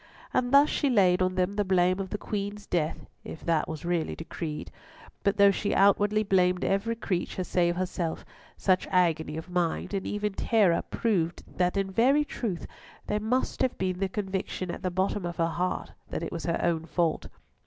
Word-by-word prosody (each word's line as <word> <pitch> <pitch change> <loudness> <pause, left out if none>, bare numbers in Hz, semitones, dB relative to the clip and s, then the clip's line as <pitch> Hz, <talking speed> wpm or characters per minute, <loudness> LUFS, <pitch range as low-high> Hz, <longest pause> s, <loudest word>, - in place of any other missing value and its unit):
And 245 0 +1
thus 280 +2 +7
she 285 - 0
laid 185 -6 +4
on 185 0 +1
them 185 +1 +1
the 205 0 +1
blame 185 -1 +2
of 190 -1 -3
the 210 - -3
Queen's 205 0 -4
death 165 -5 -1 0.2
(if - - -9
that 165 -2 +1
was 160 0 -6
really 175 -2 -1
decreed), 160 -1 -6 0.5
but 200 +1 +1
though 200 -1 +7
she 205 +1 -1
outwardly 205 +2 +4
blamed 180 -2 +2
every 200 +4 0
creature 185 -4 -2
save 175 -1 +1
herself, 180 -2 -3 0.3
such 185 -2 +2
agony 160 -4 +1
of 160 - -6
mind, 175 +2 -1
and 195 -1 -2
even 205 0 -2
terror, 200 -6 +3
proved 180 -7 0
that 180 +2 -1
in 195 -1 0
very 270 +9 +4
truth 205 -11 -4 0.4
there 210 - -1
must 235 +5 -1
have 260 -1 +1
been 185 -1 -1
the 195 -1 0
conviction 190 -2 -3
at - - -7
the 185 - -1
bottom 190 +2 -1
of 175 -1 -4
her 165 - +2
heart 175 +2 -2 0.2
that - - -3
it 165 - -4
was 170 - -5
her 170 - 0
own 165 -2 +1
fault. 170 -3 0
185 Hz, 190 wpm, -28 LUFS, 175-205 Hz, 0.5 s, thus